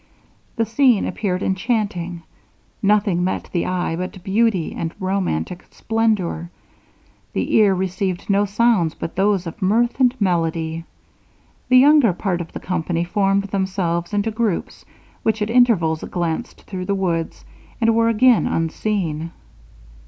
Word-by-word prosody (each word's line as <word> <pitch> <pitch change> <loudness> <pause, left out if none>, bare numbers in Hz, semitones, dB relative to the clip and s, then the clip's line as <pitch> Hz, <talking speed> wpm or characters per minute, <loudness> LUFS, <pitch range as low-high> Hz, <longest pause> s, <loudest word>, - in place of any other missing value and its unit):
The 230 - +1
scene 235 -1 +3
appeared 190 -3 -2
enchanting. 190 -4 -2 0.6
Nothing 200 -3 +2
met 185 - -3
the 175 - 0
eye 180 -2 -1
but 180 +1 -6
beauty 200 -3 +1
and 165 -1 -4
romantic 185 - -2
splendour; 215 -7 -1 0.8
the - - -2
ear 205 -3 +5
received 185 0 -2
no 200 0 +2
sounds 205 -5 +2
but 165 - -6
those 195 -1 +1
of 170 +6 -8
mirth 230 +7 +1
and 255 0 +3
melody. 165 -3 -1 0.8
The 255 - +6
younger 275 -5 +6
part 180 -1 -2
of 165 - -8
the - - -6
company 170 -1 -2
formed 195 +2 +1
themselves 185 -3 -1
into 205 +2 0
groups, 220 -5 -2 0.4
which 220 0 0
at 210 +1 -1
intervals 205 -11 +3
glanced 175 +5 -4
through 185 -2 -6
the 200 - 0
woods, 170 -4 -2 0.3
and 230 -1 +3
were 230 0 +3
again 235 +1 +4
unseen. 165 -1 -2
190 Hz, 135 wpm, -21 LUFS, 175-220 Hz, 0.8 s, The